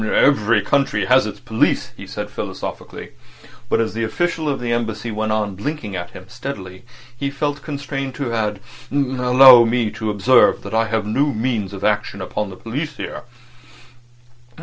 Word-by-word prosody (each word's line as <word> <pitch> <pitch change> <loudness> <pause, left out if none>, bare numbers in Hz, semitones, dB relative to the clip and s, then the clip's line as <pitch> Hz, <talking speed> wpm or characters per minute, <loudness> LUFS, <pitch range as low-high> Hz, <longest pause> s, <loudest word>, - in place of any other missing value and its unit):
"Every 110 -2 +3
country 140 +6 +1
has - - +4
its - - -7
police," - - 0
he - - -10
said - - -6
philosophically. - - -6 0.6
But - - +2
as 115 -1 0
the 115 +1 -2
official 160 +6 -1
of 140 - -1
the 120 -1 -1
Embassy 115 -1 -2
went 110 0 -2
on 105 -2 0
blinking 110 0 -5
at 90 -1 -5
him 90 - -12
steadily 105 -6 -8 0.3
he 140 +3 -2
felt 145 +1 -3
constrained 140 -2 -5
to 130 -5 -3
add: 105 -3 -1 0.3
"Allow 130 -2 +7
me 115 -2 0
to 110 - -4
observe 115 +5 +4
that 100 - -7
I 115 0 +2
have 110 -1 -1
no 135 +8 +1
means 110 -4 -1
of 100 -1 -8
action 105 -1 0
upon 105 +2 -3
the 95 - -9
police 145 +5 -5
here." - - -6
115 Hz, 170 wpm, -20 LUFS, 105-135 Hz, 0.6 s, Allow